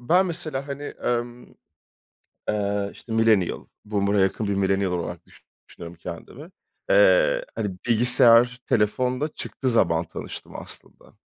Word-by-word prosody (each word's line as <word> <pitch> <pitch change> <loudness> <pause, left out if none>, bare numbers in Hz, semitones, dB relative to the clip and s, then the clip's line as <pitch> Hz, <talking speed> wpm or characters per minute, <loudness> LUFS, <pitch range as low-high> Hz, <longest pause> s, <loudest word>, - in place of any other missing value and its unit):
Ben 180 +10 +3
mesela, 155 -5 -3
hani, 140 +1 -5
emm, 120 -3 -3 1.0
eee, 100 -1 -1
işte, 115 - -12
millennial 110 -5 +2 0.2
boomer'a 100 -1 0
yakın 95 +3 +1
bir 100 - 0
millennial 95 -1 +1
olarak 90 -1 -4
düşü - - -21 0.3
düşünüyorum 85 0 -10
kendimi, 120 - -9 0.4
eee, - - +4
hani, 95 -3 -3
bilgisayar, 120 +1 +5
telefon 125 +5 +1
da 150 - +1
çıktığı 135 -3 -4
zaman 85 -8 +2
tanıştım 80 - -8
aslında. - - -7
115 Hz, 125 wpm, -24 LUFS, 100-140 Hz, 1.0 s, bilgisayar